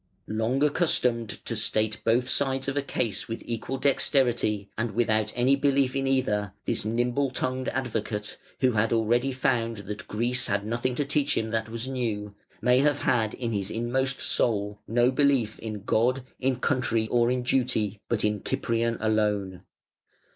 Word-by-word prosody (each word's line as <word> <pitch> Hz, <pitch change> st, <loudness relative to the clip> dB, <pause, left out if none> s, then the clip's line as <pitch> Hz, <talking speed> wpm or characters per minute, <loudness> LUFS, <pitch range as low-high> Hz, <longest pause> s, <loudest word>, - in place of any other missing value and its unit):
Long 110 Hz, +6 st, 0 dB
accustomed 125 Hz, -7 st, +2 dB, 0.2 s
to -, -, -2 dB
state 110 Hz, 0 st, +1 dB
both 120 Hz, +2 st, +2 dB
sides 135 Hz, 0 st, +1 dB
of 135 Hz, -, -1 dB
a 145 Hz, -, +1 dB
case 115 Hz, -6 st, -2 dB
with 115 Hz, -, -5 dB
equal 120 Hz, +3 st, -3 dB
dexterity, 120 Hz, -7 st, +1 dB
and 115 Hz, -2 st, -3 dB
without 110 Hz, -2 st, +1 dB
any 125 Hz, +3 st, +3 dB
belief 140 Hz, -2 st, +1 dB
in 135 Hz, 0 st, 0 dB
either, 105 Hz, -7 st, 0 dB
this -, -, -1 dB
nimble 120 Hz, +5 st, 0 dB
tongued 130 Hz, 0 st, -2 dB
advocate, 110 Hz, -5 st, -3 dB, 0.2 s
who 130 Hz, -1 st, +4 dB
had 110 Hz, 0 st, +1 dB
already 120 Hz, +4 st, +2 dB
found 120 Hz, -3 st, 0 dB
that 105 Hz, +1 st, -6 dB
Greece 120 Hz, +4 st, 0 dB
had 105 Hz, 0 st, -1 dB
nothing 120 Hz, +3 st, -1 dB
to 145 Hz, -, 0 dB
teach 145 Hz, 0 st, +1 dB
him 110 Hz, 0 st, -1 dB
that 110 Hz, -1 st, -1 dB
was 115 Hz, +2 st, -2 dB
new, 110 Hz, -6 st, -3 dB, 0.3 s
may 125 Hz, +1 st, +4 dB
have 145 Hz, +1 st, +2 dB
had 110 Hz, -4 st, +1 dB
in 120 Hz, -2 st, -3 dB
his 100 Hz, -2 st, -2 dB
inmost 130 Hz, +4 st, -1 dB
soul 105 Hz, -2 st, +1 dB
no 120 Hz, +2 st, +3 dB
belief 130 Hz, -5 st, +1 dB
in 105 Hz, -3 st, -6 dB
God, 125 Hz, +5 st, +1 dB, 0.2 s
in 130 Hz, 0 st, +1 dB
country, 115 Hz, -3 st, 0 dB
or 120 Hz, 0 st, +3 dB
in 125 Hz, 0 st, 0 dB
duty, 120 Hz, -5 st, 0 dB
but 115 Hz, -3 st, +1 dB
in 105 Hz, -2 st, 0 dB
Cyprian 115 Hz, 0 st, -1 dB
alone. 105 Hz, -4 st, 0 dB
120 Hz, 165 wpm, -26 LUFS, 110-130 Hz, 0.3 s, who